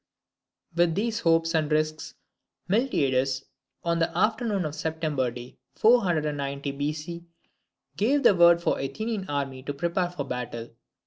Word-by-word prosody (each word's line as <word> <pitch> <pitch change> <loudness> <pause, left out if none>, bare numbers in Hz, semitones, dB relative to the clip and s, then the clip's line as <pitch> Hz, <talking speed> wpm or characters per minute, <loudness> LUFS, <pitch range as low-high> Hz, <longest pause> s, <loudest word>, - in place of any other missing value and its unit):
With 170 -1 +3
these 225 +2 -1
hopes 165 -3 +2
and 155 -2 +1
risks, 155 0 -1 0.5
Miltiades, 135 - +1 0.4
on 170 0 0
the 165 - +2
afternoon 215 -4 +1
of 150 - -2
a - - -14
September 155 -4 -1
day, 120 +1 -10 0.2
490 150 - +2
B.C., 150 +4 -4 0.7
gave 275 - +2
the - - +7
word 170 -1 +6
for 165 - +1
the 135 - -2
Athenian 205 +8 -4
army 135 -2 -3
to 145 +2 -5
prepare 170 +4 0
for 175 -5 -4
battle. 120 -3 -5
160 Hz, 140 wpm, -26 LUFS, 140-180 Hz, 0.7 s, the